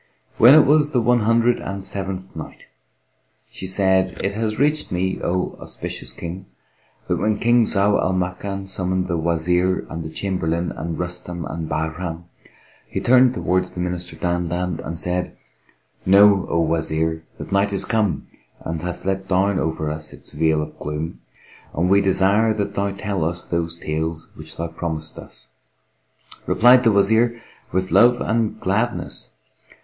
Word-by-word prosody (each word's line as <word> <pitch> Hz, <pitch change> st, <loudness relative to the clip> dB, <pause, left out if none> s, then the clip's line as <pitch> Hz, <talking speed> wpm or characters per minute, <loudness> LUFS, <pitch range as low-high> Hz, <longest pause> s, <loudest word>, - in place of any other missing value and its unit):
When 125 Hz, +6 st, +9 dB
it 155 Hz, -, +7 dB
was 150 Hz, +1 st, +3 dB
the 125 Hz, -, +3 dB
One 120 Hz, +1 st, +3 dB
Hundred 115 Hz, +2 st, +3 dB
and 100 Hz, 0 st, -5 dB
Seventh 95 Hz, -1 st, -4 dB
Night, 80 Hz, -, -9 dB, 0.9 s
She 95 Hz, -, -7 dB
said, 95 Hz, -1 st, +2 dB
It 100 Hz, +1 st, 0 dB
hath 110 Hz, 0 st, -2 dB
reached 150 Hz, +3 st, +1 dB
me, 95 Hz, +1 st, -1 dB
O 90 Hz, +1 st, -1 dB
auspicious -, -, -6 dB
King, 90 Hz, +3 st, -7 dB, 0.6 s
that -, -, 0 dB
when 110 Hz, -1 st, +1 dB
King 120 Hz, +1 st, +4 dB
Zau 100 Hz, +1 st, +2 dB
Al 95 Hz, -, +1 dB
Makan 95 Hz, +2 st, -3 dB
summoned 95 Hz, -1 st, -2 dB
the 90 Hz, -, -1 dB
Wazir 85 Hz, +3 st, +1 dB
and 80 Hz, -, -4 dB
the 80 Hz, -, -6 dB
Chamberlain 85 Hz, -1 st, -2 dB
and 80 Hz, 0 st, -5 dB
Rustam 90 Hz, 0 st, -5 dB
and 80 Hz, -1 st, -5 dB
Bahram, 80 Hz, +1 st, -3 dB, 0.6 s
he -, -, -3 dB
turned 130 Hz, 0 st, +5 dB
towards 90 Hz, 0 st, 0 dB
the -, -, -9 dB
Minister 90 Hz, -1 st, -4 dB
Dandan 90 Hz, 0 st, -2 dB
and 80 Hz, 0 st, -5 dB
said, 90 Hz, +1 st, -2 dB, 0.7 s
"Know, 100 Hz, 0 st, +6 dB
O 85 Hz, -, +1 dB
Wazir, 80 Hz, 0 st, 0 dB
that -, -, -8 dB
night 100 Hz, +1 st, +2 dB
is 100 Hz, -, 0 dB
come 110 Hz, -4 st, 0 dB, 0.4 s
and 80 Hz, -1 st, -4 dB
hath 90 Hz, +1 st, -5 dB
let 95 Hz, 0 st, -1 dB
down 95 Hz, +1 st, +2 dB
over 80 Hz, -1 st, -2 dB
us 75 Hz, 0 st, -6 dB
its -, -, -10 dB
veil 80 Hz, 0 st, +1 dB
of -, -, -11 dB
gloom, 75 Hz, +3 st, -5 dB, 0.5 s
and 90 Hz, +4 st, +1 dB
we 100 Hz, +1 st, +6 dB
desire 100 Hz, +3 st, +3 dB
that 100 Hz, -2 st, -2 dB
thou 100 Hz, 0 st, 0 dB
tell 100 Hz, -2 st, -3 dB
us 85 Hz, +2 st, -1 dB
those 85 Hz, 0 st, -2 dB
tales 80 Hz, 0 st, -3 dB
which -, -, -11 dB
thou 85 Hz, -, -2 dB
promisedst 80 Hz, -1 st, -5 dB
us." -, -, -15 dB, 1.0 s
Replied 125 Hz, +2 st, +6 dB
the 115 Hz, -, +6 dB
Wazir, 110 Hz, +4 st, +3 dB, 0.3 s
"With 95 Hz, +1 st, -1 dB
love 120 Hz, +1 st, +5 dB
and 115 Hz, -1 st, -1 dB
gladness! 110 Hz, +6 st, -2 dB
95 Hz, 160 wpm, -21 LUFS, 85-100 Hz, 1.0 s, When